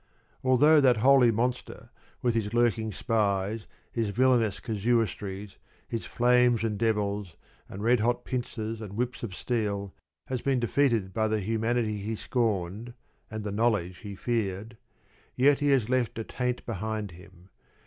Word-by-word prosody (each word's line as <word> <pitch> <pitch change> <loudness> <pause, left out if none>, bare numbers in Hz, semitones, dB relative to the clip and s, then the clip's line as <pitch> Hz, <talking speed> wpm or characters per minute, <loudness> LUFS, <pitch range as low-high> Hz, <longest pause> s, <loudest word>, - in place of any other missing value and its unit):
Although 145 +4 +5
that 125 -3 +5
holy 130 +1 +6
monster, 120 +3 -2 0.3
with 120 -1 +2
his 110 -1 -1
lurking 115 -2 +2
spies, 105 -1 -1 0.2
his 115 -3 -1
villainous 115 -3 +2
casuistries, 105 -2 -2 0.3
his 115 - -4
flames 125 -1 +3
and 110 -2 0
devils, 105 -5 -1 0.3
and 100 +2 -7
red 120 +1 +4
hot 120 +2 0
pincers, 115 -3 -4
and 105 -3 -7
whips 125 +3 -2
of 100 -6 -5
steel, 100 -5 -2 0.3
has 130 -2 -3
been 135 -2 +1
defeated 120 -5 +1
by 110 -1 +1
the 110 0 0
humanity 110 +1 0
he 105 +3 -3
scorned 110 -1 -2 0.3
and 110 -1 -5
the 105 - -3
knowledge 100 -5 0
he 100 -3 -8
feared, 110 0 -2 0.6
yet 140 +2 +4
he 145 - 0
has 130 -6 +3
left 125 -3 0
a 115 - -2
taint 125 +2 -3
behind 110 -2 -3
him. 90 +1 -16
115 Hz, 150 wpm, -28 LUFS, 105-120 Hz, 0.6 s, holy